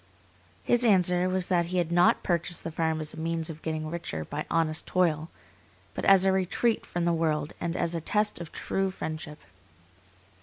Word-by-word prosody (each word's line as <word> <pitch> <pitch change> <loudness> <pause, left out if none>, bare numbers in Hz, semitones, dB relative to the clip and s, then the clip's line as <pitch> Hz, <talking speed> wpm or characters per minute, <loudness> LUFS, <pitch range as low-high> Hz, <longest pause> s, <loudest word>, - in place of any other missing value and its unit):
His 240 0 +2
answer 180 -4 +4
was 185 -1 0
that 175 -2 +1
he 185 +1 -2
had 170 -2 0
not 175 +1 +4
purchased 170 -1 -1
the 165 - -4
farm 160 0 -1
as 155 - -2
a - - -11
means 165 0 -1
of 160 0 -11
getting 155 -1 -3
richer 155 - -5
by 150 +1 -5
honest 160 -1 0
toil, 165 -3 +1 0.6
but - - -4
as 195 -1 +6
a 190 - +4
retreat 190 +5 0
from 175 -1 -2
the 170 - +2
world 155 -2 -1
and 170 +1 -2
as 170 - -1
a 165 - -2
test 210 +2 0
of 170 - -8
true 195 0 -2
friendship. 155 -4 -6
170 Hz, 190 wpm, -28 LUFS, 160-185 Hz, 0.6 s, as